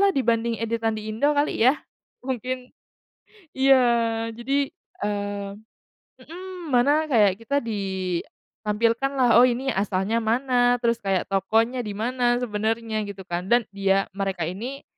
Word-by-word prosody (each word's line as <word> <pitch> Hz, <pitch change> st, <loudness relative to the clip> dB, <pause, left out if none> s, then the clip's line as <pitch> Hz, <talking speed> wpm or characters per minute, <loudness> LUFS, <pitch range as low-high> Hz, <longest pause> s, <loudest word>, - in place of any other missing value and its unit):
lah 400 Hz, -, +5 dB
dibanding 235 Hz, -7 st, +1 dB
editan 225 Hz, 0 st, -1 dB
di 215 Hz, 0 st, -5 dB
Indo 285 Hz, +7 st, +1 dB
kali 290 Hz, -5 st, 0 dB
ya, 290 Hz, -, +3 dB, 0.5 s
mungkin 255 Hz, 0 st, -4 dB, 0.8 s
iya 235 Hz, -4 st, +3 dB
jadi, 275 Hz, +4 st, 0 dB, 0.4 s
eee 205 Hz, -1 st, -3 dB, 0.7 s
mhm, 360 Hz, 0 st, -9 dB
mana 285 Hz, +5 st, +3 dB
kayak 205 Hz, -6 st, +3 dB
kita 280 Hz, +5 st, -1 dB
ditampilkan 210 Hz, +4 st, -2 dB
lah, 250 Hz, -2 st, +4 dB
oh 255 Hz, -, +7 dB
ini 260 Hz, +2 st, -1 dB
asalnya 195 Hz, +3 st, 0 dB
mana, 245 Hz, +2 st, +2 dB
terus 235 Hz, 0 st, +2 dB
kayak 195 Hz, -2 st, 0 dB
tokonya 225 Hz, +6 st, +1 dB
di 210 Hz, -3 st, -6 dB
mana 240 Hz, +2 st, +1 dB
sebenarnya 220 Hz, 0 st, -1 dB
gitu 195 Hz, -1 st, -8 dB
kan 175 Hz, 0 st, -4 dB
dan 240 Hz, 0 st, +4 dB
dia 195 Hz, 0 st, +2 dB
mereka 195 Hz, -3 st, -2 dB
ini 235 Hz, -, -6 dB
230 Hz, 130 wpm, -24 LUFS, 205-255 Hz, 0.8 s, oh